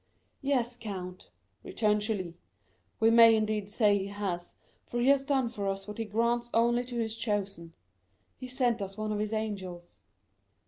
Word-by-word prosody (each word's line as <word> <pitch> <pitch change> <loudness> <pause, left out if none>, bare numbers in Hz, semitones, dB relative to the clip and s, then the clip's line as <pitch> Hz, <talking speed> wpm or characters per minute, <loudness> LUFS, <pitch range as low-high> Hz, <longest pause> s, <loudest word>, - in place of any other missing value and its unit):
"Yes, 255 -3 +1
count," 185 -5 -7 0.3
returned 210 -1 +1
Julie, 195 -6 -3 0.6
"we 225 +1 +5
may 230 -1 +8
indeed 215 -2 -1
say 210 -1 +3
he 195 - -4
has, 195 -4 -4 0.3
for 240 - -4
he 245 +3 +3
has 280 -1 +4
done 270 -3 +1
for 210 -4 -4
us 195 0 -3
what 210 +1 -7
he 225 - -1
grants 235 +3 0
only 235 +1 +3
to 245 -1 -6
his 225 -1 -2
chosen; 200 -7 -3 0.6
he 255 - -8
sent 250 -3 +1
us 195 +1 -5
one 215 0 -2
of 210 - -1
his 210 0 -2
angels." 190 -6 -5
215 Hz, 170 wpm, -30 LUFS, 200-235 Hz, 0.6 s, may